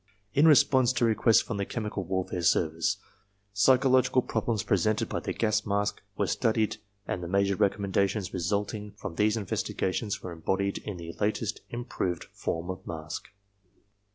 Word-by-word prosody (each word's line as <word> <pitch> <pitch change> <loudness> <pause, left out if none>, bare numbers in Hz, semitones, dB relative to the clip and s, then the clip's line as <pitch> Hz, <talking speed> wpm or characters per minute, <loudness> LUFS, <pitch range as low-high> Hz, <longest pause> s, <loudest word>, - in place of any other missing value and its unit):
In 145 +3 +5
response 130 -4 +5
to 120 - +2
requests 110 0 +4
from 105 - -4
the 100 - -1
Chemical 105 -4 -3
Warfare 90 0 -2
Service, 80 -1 +2 0.6
psychological 130 +3 +4
problems 110 -4 -1
presented 105 +3 +1
by - - -2
the - - -4
gas 110 -1 +1
mask 100 0 -1 0.2
were - - +2
studied 110 -1 +1
X - - -12 0.3
INTRODUCTION - - +1
and 90 - -5
the - - -4
major 100 +2 +2
recommendations 100 -1 0
resulting 105 +3 -2
from 100 - -7
these 105 +5 +2
investiga 95 -2 -2
tions 105 0 -3
were 90 - -5
embodied 95 +4 -1
in 105 -4 -6
the 85 0 -7
latest 110 +2 -1
improved 120 -8 -3
form 85 +3 -3
of 95 +1 -9
mask. 80 -2 -6
100 Hz, 160 wpm, -28 LUFS, 95-110 Hz, 0.6 s, In